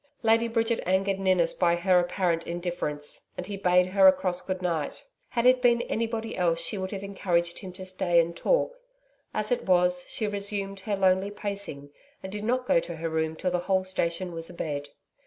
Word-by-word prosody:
Lady 225 +1 +4
Bridget 230 0 +1
angered 195 +1 +1
Ninnis 185 -3 +3
by 170 -1 +2
her 180 +1 +3
apparent 175 -1 0
indifference, 170 -4 -4
and 180 - -4
he 200 +1 -5
bade 180 -2 +3
her 190 +1 +5
a - - +10
cross 185 -1 -2
good 185 -1 -3
night. 170 -5 -2 0.2
Had 235 0 -1
it 255 0 +6
been 240 -1 +4
anybody 225 0 -2
else 170 -2 +1
she 170 - -4
would 190 -1 -3
have 200 -1 -5
encouraged 175 -3 -1
him 190 -2 -8
to 185 +1 -8
stay 185 -2 +2
and 170 0 +1
talk. - - +1 0.6
As 215 +1 -1
it 245 - 0
was, 180 -1 +3
she 220 - -2
resumed 200 -1 -3
her 205 +1 -2
lonely 190 0 +2
pacing, 200 -9 -6 0.3
and 190 - -6
did 210 +1 -5
not 250 +3 0
go 170 - +4
to 170 0 -6
her 165 +1 -3
room 160 0 -1
till 180 +3 -2
the 180 - +1
whole 185 +1 +1
station 185 -1 -1
was 165 0 -4
abed. 145 -4 -4
185 Hz, 200 wpm, -27 LUFS, 175-200 Hz, 0.6 s, a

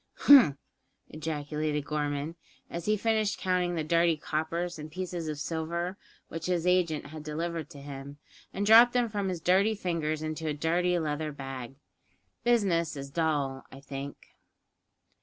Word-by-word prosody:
"Humph!" 245 - +8 0.5
ejaculated 150 -1 -3
Gorman, 145 +1 -2 0.4
as 170 0 -5
he 215 0 +2
finished 215 -1 +1
counting 180 -1 0
the 160 - -1
dirty 165 +1 +3
coppers 165 +3 -2
and 155 +1 -8
pieces 180 -2 -4
of 155 -1 -3
silver 170 +4 -3 0.3
which 165 - -5
his 175 -2 0
agent 180 -4 +2
had 155 +1 -9
delivered 165 +1 -3
to 145 - -11
him, 140 0 -8 0.3
and 200 - -2
dropped 230 +3 +8
them 245 -2 +2
from 205 -2 -2
his 180 -2 -3
dirty 195 +6 +3
fingers 160 -5 -2
into 155 0 -3
a 150 - 0
dirty 175 +4 +1
leather 155 -1 -2
bag: 135 -2 -7 0.7
"Business 190 -10 +2
is 140 0 -7
dull, 145 -4 0
I 135 - -10
think." 140 0 -7
160 Hz, 150 wpm, -29 LUFS, 150-180 Hz, 0.7 s, Humph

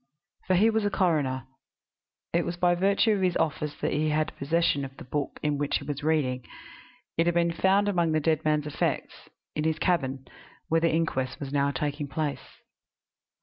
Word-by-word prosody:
For 185 - +3
he 215 +5 +5
was 220 -1 +1
a 205 - +2
coroner. 150 -10 +1 0.9
It 170 0 +2
was 170 +1 -4
by 175 0 +3
virtue 195 +5 +3
of 205 -2 +1
his 180 -2 +2
office 150 -1 -1
that - - 0
he 155 +2 +1
had 155 +1 0
possession 145 0 +1
of 135 0 -8
the - - -9
book 140 +3 -3
in 150 -1 0
which 145 -1 +1
he - - -9
was 145 0 -4
reading; 145 -5 0 0.8
it 165 - +3
had 175 - +2
been 170 0 +3
found 195 +4 +3
among 175 -5 +2
the 155 - +2
dead 155 0 +1
man's 150 -1 +1
effects 150 - -3 0.3
in 150 - -1
his 160 0 +1
cabin, 135 -7 0 0.4
where 165 0 +3
the 165 - +3
inquest 135 -5 -1
was 140 -1 -6
now 140 0 +2
taking 145 +2 -2
place. 145 0 -4
155 Hz, 190 wpm, -27 LUFS, 145-175 Hz, 0.9 s, he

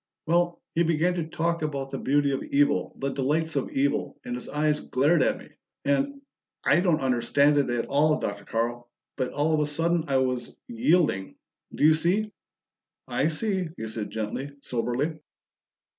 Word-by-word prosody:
"Well 175 +1 +1
he 170 - +1
began 170 +1 +2
to 170 -3 -3
talk 170 +1 -1
about 140 -3 -3
the - - -4
beauty 145 0 +2
of 135 - -1
evil, 145 +1 +1
the 135 0 -2
delights 155 +4 0
of 140 - -1
evil, 140 +1 0
and 125 - -4
his 125 - -7
eyes 150 +1 +1
glared 145 +5 +2
at - - +2
me, - - -13 0.4
and 275 - 0 0.4
I - - +5
don't 175 -5 +2
understand 140 +3 +3
it 140 - +1
at 120 -1 0
all, 150 +2 +2
Dr. 100 0 -4
Carl, 120 +1 -2 0.3
but 125 - -2
all 150 +2 +1
of 155 - +3
a 150 - +1
sudden 165 +2 0
I 135 -1 +2
was 125 -2 -1
yielding. 180 - +1 0.4
Do - - -1
you 155 +1 +7
see?" 185 +7 +1 0.8
"I - - +1
see," 190 +2 -1
he 110 - -4
said 110 -1 -4
gently, 110 +6 -4
soberly. 130 +6 -2
145 Hz, 175 wpm, -26 LUFS, 130-165 Hz, 0.8 s, you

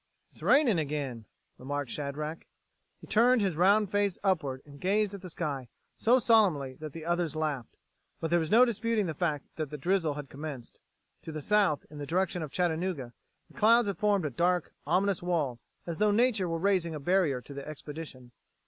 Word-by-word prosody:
"It's - - -16
raining 255 - +4
again," 140 -7 -3 0.3
remarked 140 -1 -4
Shadrack. 150 +2 -5 0.5
He - - -10
turned 235 +1 +4
his 190 -5 0
round 200 +4 +4
face 205 -2 +1
upward 145 -9 0
and 140 -1 -14
gazed 205 +2 +1
at 200 - -7
the 185 - -8
sky 145 -7 -4 0.3
so 240 +3 +4
solemnly 195 - +3
that 155 -1 -6
the 165 -1 -8
others 170 -2 0
laughed. 150 -6 -3 0.4
But 160 - -3
there 175 - +4
was 160 -2 -2
no 235 +5 +7
disputing 230 -2 0
the 165 - -2
fact: 150 -3 -1
the 150 -2 -4
drizzle 165 -1 0
had 145 -1 -6
commenced. 140 -3 -8 0.4
To 160 - -7
the 155 - -5
south, 195 -2 +2
in 150 - -9
the 145 - -5
direction 180 +1 0
of 155 - -4
Chattanooga, 170 -7 -1 0.3
the - - -15
clouds 230 +1 +5
had 195 -4 -3
formed 205 -5 +2
a 150 - -2
dark, 175 +5 0
ominous 190 +3 +2
wall, 155 -9 -1 0.3
as 170 -2 -4
though 210 +3 +3
nature 215 -4 +2
were 165 - -1
raising 175 -3 +1
a - - -4
barrier 170 -4 +2
to 140 - -11
the 140 0 -7
expedition. 150 -4 -9
165 Hz, 190 wpm, -29 LUFS, 145-200 Hz, 0.5 s, no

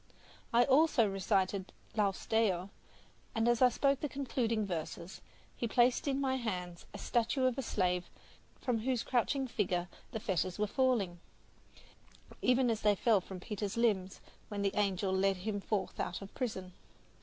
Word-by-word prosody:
I 235 +1 +5
also 275 -3 +4
recited 195 0 0 0.2
"Laus 200 -3 0
Deo," 200 -4 +1 0.6
and 225 +1 +2
as 240 0 +3
I 255 - +8
spoke 275 +2 +2
the 295 - -2
concluding 235 -5 -1
verses, 170 0 -5 0.3
he 235 - -2
placed 245 +4 +3
in 275 -1 +1
my 265 -1 +1
hands 180 -7 -4
a - - -8
statue 245 +3 +1
of 255 -2 +2
a 270 - -2
slave 180 -6 0 0.5
from 245 -3 0
whose 250 +1 0
crouching 265 +2 +1
figure 185 -7 -1 0.2
the 220 - -3
fetters 185 -3 -1
were 210 - +1
falling, 210 -7 +1 1.2
even 250 -1 +3
as 220 - -2
they 210 -1 +4
fell 215 -1 +3
from 185 0 -8
Peter's 205 +1 -4
limbs 200 -5 +1 0.3
when 205 -1 -3
the 195 0 +1
angel 195 -2 +1
led 195 0 +2
him 205 +2 -3
forth 205 -1 -2
out 180 - -3
of 195 - -11
prison. 190 -8 -4
215 Hz, 160 wpm, -33 LUFS, 190-245 Hz, 1.2 s, I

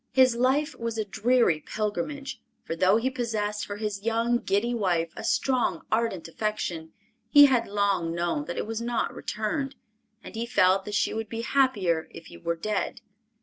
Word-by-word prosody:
His 255 -2 +5
life 275 +6 +2
was 230 -1 -3
a 215 - -1
dreary 215 -3 +2
pilgrimage, 265 - -4 0.2
for 165 - -4
though 185 +5 +4
he 255 +3 0
possessed 215 -4 -2
for 205 - -5
his 210 -2 -3
young, 230 +2 +1
giddy 220 +4 0
wife, 175 -7 0
a - - -7
strong, 250 +2 +1
ardent 220 -7 0
affection, 170 -4 -3 0.4
he 290 +3 +9
had 250 -4 +2
long 200 -4 0
known 170 -3 -1
that 175 - -5
it - - -1
was 225 +1 -4
not 235 -1 -1
returned, 270 +6 -3 0.5
and - - -10
he 230 +1 -3
felt 190 -3 +3
that 210 - -4
she - - +1
would 220 -1 -4
be 230 0 -4
happier 215 -11 +1
if 165 - -11
he - - -12
were 170 0 -1
dead. 205 +4 -3
215 Hz, 180 wpm, -27 LUFS, 190-240 Hz, 0.5 s, he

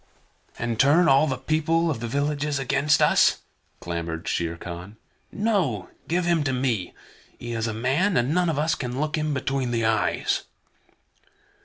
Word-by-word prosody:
"And 120 -1 -3
turn 160 +6 +5
all 135 +2 +5
the 135 - -1
people 160 +1 +1
of 130 - -3
the 120 - -4
villages 145 +3 -1
against 140 +2 +2
us?" - - +4 0.4
clamored 85 -1 -5
Shere 85 0 -1
Khan. 90 +5 -8 0.3
"No, 195 - 0 0.2
give 175 +1 0
him 170 -3 +2
to 135 - 0
me. 125 -8 -1 0.4
He 120 - -7
is 115 0 -1
a - - -1
man, 140 - +1
and 125 +5 +1
none 180 0 +2
of 155 - -1
us 155 +2 +1
can 125 -1 -4
look 150 0 -1
him 155 -1 -1
between 135 -2 -1
the 115 -1 0
eyes." 110 0 +1
135 Hz, 165 wpm, -24 LUFS, 115-155 Hz, 0.4 s, turn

